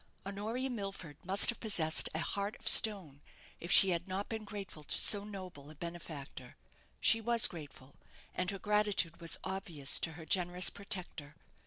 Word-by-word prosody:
Honoria 220 Hz, +7 st, -5 dB
Milford 195 Hz, -, -7 dB
must 195 Hz, +3 st, +4 dB
have 235 Hz, -, -2 dB
possessed 170 Hz, -8 st, +3 dB
a -, -, -1 dB
heart 200 Hz, +5 st, -4 dB
of 225 Hz, -, -11 dB
stone, 185 Hz, -12 st, +5 dB, 0.4 s
if 170 Hz, -, -7 dB
she 195 Hz, -, +6 dB
had 175 Hz, 0 st, -3 dB
not 190 Hz, +2 st, -5 dB
been 220 Hz, -1 st, -6 dB
grateful 200 Hz, -6 st, -10 dB
to -, -, -3 dB
so 205 Hz, -1 st, +7 dB
noble 185 Hz, -8 st, -11 dB
a 155 Hz, -, -14 dB
benefactor. 165 Hz, -3 st, -10 dB, 0.4 s
She 225 Hz, -, +2 dB
was 235 Hz, 0 st, +3 dB
grateful, 145 Hz, -4 st, -7 dB, 0.4 s
and 185 Hz, 0 st, -3 dB
her 200 Hz, -, -3 dB
gratitude 205 Hz, -4 st, -1 dB
was 165 Hz, -, -2 dB
obvious 175 Hz, -7 st, -1 dB
to 160 Hz, -, -4 dB
her 160 Hz, 0 st, -12 dB
generous 180 Hz, +1 st, +3 dB
protector. 180 Hz, -7 st, -8 dB
185 Hz, 165 wpm, -32 LUFS, 160-205 Hz, 0.4 s, so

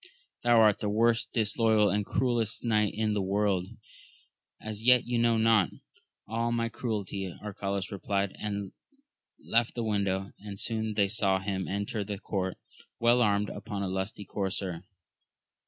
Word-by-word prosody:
thou 120 Hz, -1 st, +5 dB
art 105 Hz, -2 st, +5 dB
the 105 Hz, -, -1 dB
most 115 Hz, +2 st, +2 dB
disloyal 110 Hz, -1 st, +3 dB
and 105 Hz, 0 st, -1 dB
cruellest 120 Hz, -4 st, 0 dB
knight 105 Hz, -3 st, +2 dB
in 110 Hz, 0 st, 0 dB
the 105 Hz, -, 0 dB
world! 95 Hz, -1 st, +1 dB, 0.9 s
As 110 Hz, -1 st, -5 dB
yet 125 Hz, +1 st, +5 dB
you 120 Hz, -1 st, 0 dB
know 115 Hz, -1 st, +3 dB
not 110 Hz, -4 st, +4 dB, 0.6 s
all 115 Hz, +2 st, -1 dB
my 115 Hz, 0 st, 0 dB
cruelty, 100 Hz, -5 st, -3 dB
Arcalaus 100 Hz, -1 st, -4 dB
replied, 100 Hz, 0 st, -1 dB
and 100 Hz, -2 st, -3 dB, 0.7 s
left 115 Hz, +1 st, 0 dB
the 120 Hz, -, -2 dB
window; 100 Hz, -3 st, -1 dB
and 100 Hz, -1 st, -8 dB
soon 110 Hz, -2 st, -1 dB
they 100 Hz, -2 st, +3 dB
saw 95 Hz, -2 st, +2 dB
him 95 Hz, -1 st, -3 dB
enter 100 Hz, +2 st, -2 dB
the 100 Hz, 0 st, -5 dB
court 95 Hz, -2 st, -3 dB, 0.4 s
well 120 Hz, +1 st, +4 dB
armed, 105 Hz, -2 st, +2 dB
upon 100 Hz, -3 st, -5 dB
a -, -, -1 dB
lusty 95 Hz, +2 st, -3 dB
courser. 95 Hz, -3 st, -3 dB
105 Hz, 150 wpm, -29 LUFS, 100-115 Hz, 0.9 s, thou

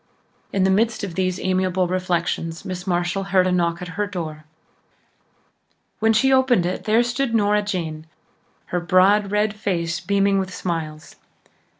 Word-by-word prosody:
In 195 Hz, -, +1 dB
the 190 Hz, -, +3 dB
midst 220 Hz, +2 st, +1 dB
of 190 Hz, -4 st, -4 dB
these 185 Hz, 0 st, -1 dB
amiable 185 Hz, -1 st, 0 dB
reflections 175 Hz, -2 st, -2 dB
Miss 185 Hz, -1 st, -6 dB
Marshall 180 Hz, +2 st, -1 dB
heard 190 Hz, -2 st, +3 dB
a 185 Hz, -, +1 dB
knock 170 Hz, 0 st, 0 dB
at -, -, -6 dB
her 205 Hz, +4 st, -2 dB
door. 160 Hz, -6 st, -6 dB, 1.5 s
When 220 Hz, +1 st, +3 dB
she 265 Hz, +5 st, +3 dB
opened 255 Hz, -8 st, +3 dB
it 180 Hz, +1 st, -3 dB
there 220 Hz, +2 st, +4 dB
stood 240 Hz, 0 st, -1 dB
Nora 210 Hz, -1 st, +3 dB
Jane, 165 Hz, -6 st, -4 dB, 0.7 s
her 180 Hz, -, +2 dB
broad 190 Hz, +4 st, +3 dB
red 210 Hz, +1 st, +1 dB
face 175 Hz, -5 st, -2 dB
beaming 195 Hz, +2 st, +1 dB
with 190 Hz, -1 st, -3 dB
smiles. 160 Hz, -4 st, -5 dB
185 Hz, 155 wpm, -22 LUFS, 175-205 Hz, 1.5 s, there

